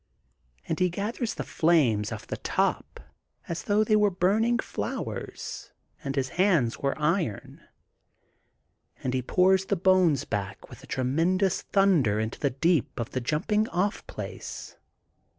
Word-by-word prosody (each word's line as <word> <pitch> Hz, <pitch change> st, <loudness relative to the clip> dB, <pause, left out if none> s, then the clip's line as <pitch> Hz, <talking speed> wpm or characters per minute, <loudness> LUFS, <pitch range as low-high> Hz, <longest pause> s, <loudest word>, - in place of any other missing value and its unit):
'* 60 Hz, 0 st, -35 dB
And 160 Hz, -, -2 dB
he 180 Hz, 0 st, +3 dB
gathers 215 Hz, +5 st, -3 dB
the -, -, -4 dB
flames 130 Hz, -11 st, +2 dB
off -, -, -6 dB
the -, -, -5 dB
top -, -, -1 dB, 0.5 s
as 170 Hz, 0 st, -3 dB
though 210 Hz, +1 st, +3 dB
they 215 Hz, 0 st, +2 dB
were 210 Hz, -1 st, +4 dB
burning 210 Hz, +6 st, +2 dB
flowers -, -, -5 dB, 0.3 s
and 135 Hz, -1 st, -3 dB
his 130 Hz, -2 st, 0 dB
hands 165 Hz, -, +2 dB
were 140 Hz, -1 st, -1 dB
iron. 155 Hz, -, -1 dB, 1.4 s
And 130 Hz, -, -1 dB
he 130 Hz, -, 0 dB
pours 190 Hz, +7 st, +3 dB
the 200 Hz, -, 0 dB
bones 185 Hz, -6 st, +3 dB
back 100 Hz, -2 st, -4 dB
with -, -, -12 dB
a -, -, -13 dB
great 165 Hz, +9 st, +1 dB, 0.2 s
thunder 165 Hz, -, +3 dB
into 110 Hz, 0 st, -3 dB
the 140 Hz, -, +1 dB
deep 150 Hz, +2 st, 0 dB
of 115 Hz, -, -4 dB
the 130 Hz, -, -2 dB
Jumping 210 Hz, -, 0 dB
off 195 Hz, +5 st, -1 dB
Place. -, -, -7 dB
170 Hz, 150 wpm, -27 LUFS, 130-195 Hz, 1.4 s, were